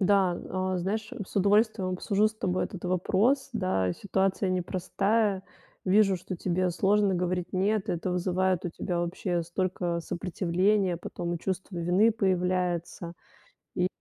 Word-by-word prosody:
Да, 190 -2 +3
а, 185 0 -1
знаешь, 215 +6 -2 0.2
с - - -11
удовольствием 200 -1 +3
обсужу 200 +3 +1
с 215 - -13
тобой 185 -3 -1
этот 185 -2 -8
вопрос. 205 +10 +1
Да, 95 - 0
ситуация 195 - 0
непростая. 190 +3 0 0.4
Вижу, 195 0 +4
что 180 +1 -6
тебе 180 +1 0
сложно 200 +2 +2
говорить 180 0 -1
"нет", 205 +3 +1
это 175 0 -1
вызывает 185 0 0
у 175 - 0
тебя 175 +1 -3
вообще 175 0 -1
столько 175 0 -2
сопротивления, 180 +2 0
потом 175 0 -4
и - - -4
чувство 185 +1 -4
вины 180 +6 +3
появляется. 180 -3 -1 0.6
И 180 - +2
185 Hz, 135 wpm, -28 LUFS, 175-200 Hz, 0.6 s, Вижу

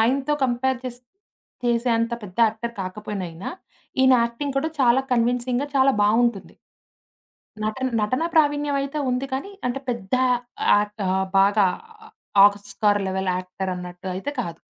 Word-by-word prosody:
ఆయనతో 270 +6 +2
కంపేర్ 255 +1 0
చేస్ 245 -1 -6 0.6
చేసే 240 0 +1
అంత 230 +1 -1
పెద్ద 185 -3 -10
యాక్టర్ 225 +2 -4
కాకపోయిన 195 +1 -5
ఈయనా, 170 +4 -6 0.5
ఈయన 260 0 +6
యాక్టింగ్ 270 +4 -4
కూడా 315 +3 0
చాలా 245 +1 +5
కన్విన్సింగ్‌గా, 245 +3 +1
చాలా 270 0 +5
బావుంటుంది. 225 0 +1 1.1
నటన 260 +5 -1
నటనా 255 +10 0
ప్రావీణ్యం 290 -2 +2
అయితే 280 +2 -4
ఉంది. 250 +2 -1
కానీ, 280 +10 -4 0.2
అంటే 270 +2 -3
పెద్ద 235 -1 -3 0.6
యాట్ 205 0 0
ఆహ్, 190 0 +1
బాగా 200 0 +4 0.4
ఆ - - -14 0.4
ఆస్కార్ 205 0 0
లెవెల్ 190 0 -1
యాక్టరన్నట్టు 180 -1 -6
అయితే 275 +10 -3
కాదు. 170 -7 -6
235 Hz, 135 wpm, -23 LUFS, 205-260 Hz, 1.1 s, ఈయన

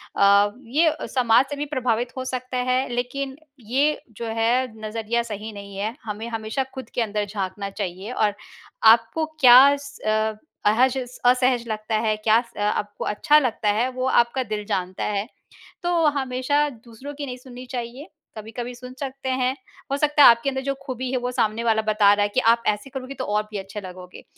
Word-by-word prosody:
अ, 200 +1 +5
ये 310 +6 +2 0.2
समाज 245 +1 +4
से 290 - -4
भी 290 +1 -3
प्रभावित 245 -1 0
हो 260 - -3
सकता 255 0 -4
है, 255 +1 +2
लेकिन, 265 +3 -3 0.2
ये 270 +7 0 0.2
जो 235 - -5
है 230 +3 +1 0.2
नज़रिया 225 +2 -1
सही 215 -1 -6
नहीं 200 -1 -10
है। 215 +4 -3
हमें 215 +2 -5
हमेशा 225 +3 -2
खुद 260 -1 -8
के 245 - 0
अंदर 210 -1 -1
झाँकना 200 0 -4
चाहिए 195 +2 -5
और 210 -4 +1 0.6
आपको 235 +8 -1
क्या 255 0 +9
स 215 -6 -2 0.3
अहज 245 +5 +3 0.3
असहज 250 -1 +3
लगता 215 0 -3
है, 215 -1 +1
क्या 220 +1 +4
स 235 -4 -19
आपको 205 0 -2
अच्छा 295 +8 +3
लगता 225 -5 -1
है 225 +5 +2
वो 255 0 -3
आपका 240 +1 +2
दिल 215 -2 -4
जानता 185 -3 -3
है। 205 +1 -1 0.6
तो 350 - 0 0.3
हमेशा 270 +2 0
दूसरों 240 +3 -11
की 290 -1 -5
नहीं 250 -1 -6
सुननी 250 0 -11
चाहिए। 250 +5 -6 0.3
कभी-कभी 235 +3 -6
सुन 250 +1 -10
सकते 270 -1 -5
हैं। 260 0 0 0.4
हो 280 - +1
सकता 295 0 +4
है - - +11
आपके 235 +4 +3
अंदर 265 0 -3
जो 275 0 -1
ख़ूबी 255 -1 -4
है 255 - 0
वो 250 0 -2
सामने 230 -2 0
वाला 220 -1 +2
बता 210 -1 +4
रहा 205 0 +2
है 205 - 0
कि, 255 - +1
आप 235 0 +3
ऐसे 210 +6 -1
करोगे 265 0 -6
तो 260 - -4
और 210 +1 0
भी 210 - -4
अच्छे 195 +2 -7
लगोगे। 180 -1 -11
235 Hz, 190 wpm, -23 LUFS, 215-260 Hz, 0.6 s, है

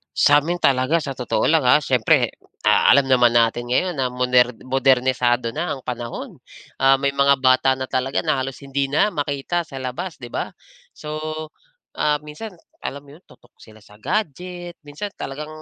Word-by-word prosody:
Sa 145 0 +5
'min 175 +2 -2
talaga 135 +4 +2
sa 140 -4 -5
totoo 125 -2 -1
lang, 160 -2 +3
ah, 125 +4 +5
siyempre, 125 -6 +2 0.3
ah, - - +5
alam 140 0 +5
naman 125 -2 +4
natin 120 +1 +1
ngayon 180 +7 +1
na 130 -3 -1
moner 125 0 +3
modernisado 130 -2 +1
na 170 +3 -2
ang 140 - -4
panahon. 120 -1 -5 0.4
Ah, 135 0 +4
may 140 0 -1
mga 140 0 +3
bata 130 0 +3
na 130 - -3
talaga 130 +1 -1
na 155 -2 0
halos 135 0 -6
hindi 140 0 -3
na 150 - +3
makita 150 0 -2
sa 135 -4 -9
labas, 155 +8 -5
'di 120 - -8
ba? - - -4 0.4
So, 150 0 -7 0.8
ah, 150 -1 +1
minsan 165 +6 -10 0.2
alam 140 +1 -6
mo 140 - -14
'yon, 175 - -20
tutok 125 - -22
sila 110 -1 -17
sa 105 -1 -19
gadget, 175 - -4
minsan 150 +8 -7
talagang 145 +3 -6
135 Hz, 175 wpm, -21 LUFS, 125-150 Hz, 0.8 s, Sa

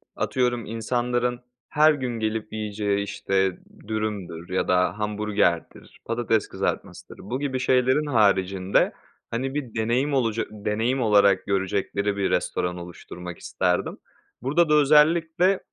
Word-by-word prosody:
atıyorum 120 -3 0
insanların 120 +2 -1 0.3
her 155 +1 +5
gün 125 -5 -3
gelip 110 0 -3
yiyeceği 105 -2 -1
işte 95 -2 -1 0.3
dürümdür 105 -6 -4
ya 90 - -1
da 90 +2 +2
hamburgerdir, 105 -5 -1
patates 115 -2 0
kızartmasıdır. - - -4
Bu 120 +6 -4
gibi 135 -2 -2
şeylerin 130 +3 +2
haricinde 100 -7 +2 0.4
hani 130 +3 -2
bir 130 -6 -4
deneyim 120 +6 0
olaca 115 -4 +1
deneyim 110 +5 -1
olarak 100 -4 +4
görecekleri 100 +1 -1
bir 100 - 0
restoran 90 0 -1
oluşturmak 90 0 -9
isterdim. - - -1 0.4
Burada 150 +6 +2
da - - +4
özellikle, 160 +5 +4
110 Hz, 120 wpm, -24 LUFS, 100-130 Hz, 0.4 s, her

